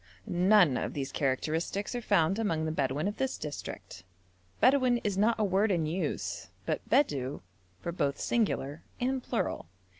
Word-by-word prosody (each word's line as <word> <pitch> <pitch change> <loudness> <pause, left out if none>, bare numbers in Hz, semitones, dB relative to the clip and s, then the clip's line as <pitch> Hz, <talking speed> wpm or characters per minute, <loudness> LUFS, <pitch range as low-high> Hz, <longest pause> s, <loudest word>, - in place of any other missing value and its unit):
None 180 -6 +4
of - - -3
these 135 -1 -3
characteristics 160 - -1
are 245 - -2
found 195 -2 +2
among 165 -8 0
the 155 - -1
Bedouin 145 +2 0
of 205 +1 -3
this 265 -1 -1
district. 145 - -7 0.6
Bedouin 255 -2 +4
is 205 -2 0
not 220 +4 +2
a - - +3
word 200 +2 +2
in 170 -5 +1
use, 170 +5 -3 0.2
but - - -1
Bedou 140 - +1 0.4
for 170 - -3
both 140 -5 -1
singular 165 - 0 0.2
and 260 +1 0
plural. 235 - -2
185 Hz, 155 wpm, -30 LUFS, 150-220 Hz, 0.6 s, None